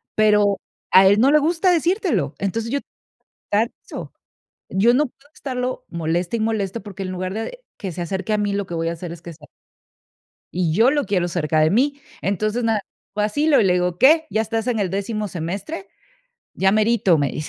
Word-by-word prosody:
pero 210 -2 +3 0.3
a 190 +1 +8
él 205 +2 +5
no 265 +5 +5
le 300 - +6
gusta 335 +4 +2
decírtelo. 345 - +1
Entonces, 220 +4 -2
yo 280 - +1 0.7
Exacto. 215 +3 -2 0.6
Yo 205 +6 +3
no 290 +4 +3
puedo 275 +2 -15
estarlo 255 -2 -4
moleste 170 +5 -1
y - - -4
moleste, 220 -1 -1
porque 195 -1 -7
en 185 - -4
lugar 185 0 -4
de 225 - -5 0.2
que 190 - -5
se 175 - -6
acerque 190 +4 -2
a - - +2
mí, 205 -1 0
lo 200 0 -1
que 175 - -8
voy 165 0 -1
a - - -2
hacer 170 0 -7
es 170 -1 -9
que 170 - -8
se 150 -1 -21
al - - -13 1.0
y 175 -3 0
yo 225 +9 +5
lo 290 -2 0
quiero 180 -4 0
cerca 160 -2 0
de 155 0 +4
mí. 280 - +1 0.2
Entonces, 215 +4 -1
nada, 225 -2 +1 0.3
lo 210 - 0
vacilo 290 +8 +3
y - - +3
le 180 - +4
digo: 180 -1 0
"¿Qué? 315 +4 +6
¿Ya 220 - +1
estás 225 +1 -2
en 240 -3 0
el 195 -3 0
décimo 210 +3 -2
semestre?", 195 - -5 0.7
"ya 190 0 +2
merito", 215 -5 +3
me 140 -2 +1
dice. 150 - -5
205 Hz, 205 wpm, -21 LUFS, 180-240 Hz, 1.0 s, a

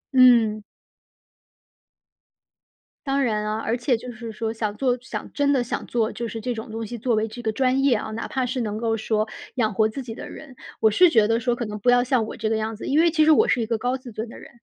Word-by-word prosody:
嗯。 230 -4 +6 2.4
当 275 0 +1
然 215 -4 0
啊， 215 +1 -2
而 225 +1 -1
且 245 0 +1
就 250 +2 -8
是 235 -1 -7
说 220 0 -3
想 215 -2 -3
做 250 -2 +1
想 255 - -7
真 285 -1 +2
的 265 -3 +2
想 240 - -4
做， 230 -1 0
就 235 - -4
是 225 - -5
这 245 +3 -2
种 220 -1 -7
东 225 -1 -5
西 240 - -6
作 235 +1 0
为 215 +1 0
这 230 +3 -9
个 220 -2 -1
专 260 +3 +1
业 275 -3 +4
啊， 215 0 -4
哪 225 +1 -4
怕 260 -1 -1
是 255 0 -2
能 210 -2 -3
够 225 0 0
说 215 0 -1 0.3
养 220 -5 +1
活 220 +2 +2
自 245 +5 -6
己 235 -3 -7
的 - - -8
人， 275 -5 -11 0.2
我 220 - +5
是 350 - +5
觉 220 -7 +4
得 225 +1 +2
说 245 0 +1
可 240 0 -3
能 210 -1 -5
不 245 - +2
要 245 0 +5
像 250 -3 +1
我 - - -8
这 220 0 -1
个 225 - +1
样 220 0 -3
子。 - - -7
因 295 +3 +2
为 335 -1 +4
其 310 -2 +3
实 315 - +6
我 305 - +5
是 245 - +2
一 - - 0
个 230 0 -1
高 250 +3 -1
自 255 -3 -11
尊 220 +2 -5
的 - - -11
人， - - -13
230 Hz, 285 characters per minute, -23 LUFS, 220-255 Hz, 2.4 s, 嗯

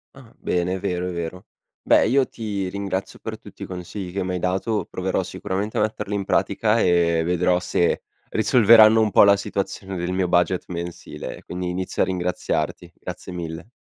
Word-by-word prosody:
Ah 130 -4 -15
bene, 90 +1 0
è - - -4
vero, 90 -2 -2
è - - -4
vero. 85 +2 -5 0.4
Beh - - +5
io 135 +1 +3
ti 105 -4 -4
ringrazio 100 0 -4
per - - -6
tutti - - -15
i - - -3
consigli 90 +1 -6
che 95 +1 -2
m'hai 90 0 -2
dato. 95 +5 -1
Proverò 95 +1 -1
sicuramente 100 +3 -4
a - - +3
metterli 105 -1 -2
in 100 -1 -2
pratica 105 +4 +2
e 85 -3 +3
vedrò 90 +1 +2
se 90 -1 +1 0.3
risolveranno 110 -1 +6
un 110 -1 +2
po' - - +7
la 100 0 +6
situazione 95 -1 -4
del 90 +1 -2
mio 95 0 0
budget 90 +1 +2
mensile. 85 -1 -6
Quindi 90 0 -4
inizio 90 +1 -2
a - - +5
ringraziarti. 90 -2 -2
Grazie 90 +1 -8
mille. 85 +2 -6
95 Hz, 180 wpm, -23 LUFS, 90-100 Hz, 0.4 s, po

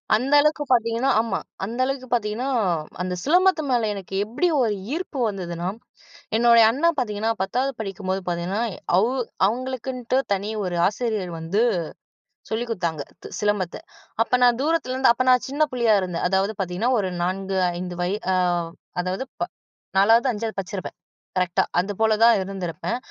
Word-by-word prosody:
அந்த 260 +6 0
அளவுக்கு 300 0 +1
பாத்தீங்கன்னா, 235 +2 +2
ஆமா. 225 -4 0 0.3
அந்த 230 +5 -6
அளவுக்கு 265 -1 -3
பார்த்தீங்கன்னா, 230 +2 -1 0.5
அந்த 180 0 -2
சிலம்பத்து 360 +3 +4
மேல 235 -3 +2
எனக்கு 195 -1 -7
எப்படி 240 +12 0 0.2
ஒரு 220 -3 +1 0.2
ஈர்ப்பு 325 -5 -4
வந்ததுன்னா 175 -3 -4 0.7
என்னுடைய 235 -1 +6
அண்ணா 300 +7 +2
பாத்தீங்கன்னா, 220 -3 0
10வது 250 +8 0
படிக்கும்போது 195 -2 -3
பார்த்தீங்கன்னா, 175 +4 -1 0.4
அவ்வு 230 +7 +2 0.3
அவங்களுக்குன்ட்டு 255 +1 -2 0.2
தனி 200 +2 -2 0.2
ஒரு 180 -1 -2
ஆசிரியர் 215 -4 -2
வந்து 170 +7 0 0.9
சொல்லிக் 235 +2 -2
குடுத்தாங்க. 170 -7 -2 0.2
த - - -7
சிலம்பத்த 205 -4 0 0.5
அப்ப 250 +2 +1
நான் 245 -1 +4
தூரத்திலேருந்து 265 -5 +2
அப்ப 245 - 0
நான் 250 -1 +3
சின்ன 290 +3 +1
புள்ளையா 235 -4 +3
இருந்தேன். 180 -2 -2
அதாவது 195 +3 +1
பார்த்தீங்கன்னா, 190 +6 0
ஒரு 190 -2 -1
4 190 +1 -2 0.2
5 180 -1 -5
வய 185 +4 0 0.2
ஆ - - +2 0.7
அதாவது, 185 +6 -2 0.2
ப - - +1 0.6
4வது 225 +6 +5
5வது 220 0 -4
படிச்சிருப்பேன் 190 0 -6 0.4
கரெக்ட்டா 180 -1 +2 0.2
அது 195 +3 -1
போல 220 0 +4
தான் 230 0 +7
இருந்திருப்பேன். 190 +3 -4
220 Hz, 145 wpm, -23 LUFS, 190-250 Hz, 0.9 s, தான்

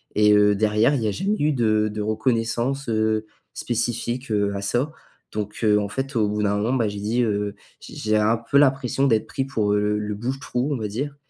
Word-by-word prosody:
et 105 0 +5
heu, 105 0 +5
derrière, 110 +6 +2
il 120 - -1
y - - +1
a - - +1
jamais 200 - -1
eu 150 0 +2
de 110 -3 +2
de 105 - -3
reconnaissance, 115 +4 -1
heu, 110 0 0 0.3
spécifique, 120 +1 -2
heu, 100 -1 +1
à 100 - -3
ça. 125 +9 0 0.4
Donc, 105 -1 -5
heu, 105 -1 +4
en 100 -1 -3
fait, 135 +3 -4
au 110 -2 +2
bout 105 +1 -1
d'un 105 0 +1
moment, 115 +5 0
bah, 115 -4 +1
j'ai 100 0 -5
dit, 110 +4 0
heu: 105 -2 -1 0.2
«J'ai - - -12
j'ai 110 0 0
un 110 +2 +3
peu 140 - +4
l'impression 135 -1 +3
d'être 110 -4 +1
pris 135 - -2
pour, 105 -6 0
heu, 105 - +2
le 105 0 0
le 105 -1 -3
bouche-trou, 130 +3 -2
on - - -1
va 110 -2 -3
dire» 140 +7 -4
110 Hz, 230 wpm, -23 LUFS, 105-130 Hz, 0.4 s, et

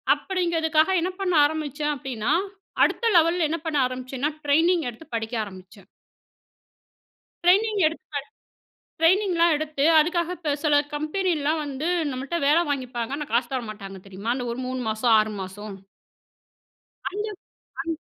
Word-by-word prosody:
அப்படிங்கிறதுக்காக 330 -3 +1
என்ன 365 +3 -1
பண்ண 370 -2 +1
ஆரம்பிச்சேன்? 295 -1 -2
அப்படின்னா, 250 -1 -2 0.5
அடுத்த 470 - +1
லெவல்ல 335 0 +3
என்ன 330 - -1
பண்ண 315 -2 -1
ஆரம்பிச்சேனா, 255 +3 -3
டிரெய்னிங் 325 +4 +3
எடுத்து 245 +7 -12
படிக்க 225 +1 -3
ஆரம்பிச்சேன். 190 0 -13 1.6
டிரெய்னிங் 410 +4 +4
எடுத்து 320 +1 -3
படு - - +1 0.8
ட்ரெய்னிங்லாம் 345 -1 +4
எடுத்து, 300 -2 -2 0.2
அதுக்காக 340 +2 +1
இப்ப 310 -4 -1
சில 300 -2 +3 0.2
கம்பெனிலாம் 310 -1 0
வந்து 285 +2 -4 0.2
நம்மள்ட்ட 265 +6 -3
வேலை 310 +4 +5
வாங்கிப்பாங்க. 255 -3 -3
ஆனா, 295 -1 -5
காசு 235 +1 +1
தர 260 - 0
மாட்டாங்க. 195 -2 -8
தெரியுமா? 195 +4 -4
அந்த 250 -1 -3
ஒரு 235 - -5
3 255 0 -3
மாசம், 220 +2 +2
6 215 0 0
மாசம். 200 +2 -7 1.4
அந்த, 415 +2 -3 0.6
அந் 330 -1 -3
295 Hz, 135 wpm, -25 LUFS, 245-335 Hz, 1.6 s, வேலை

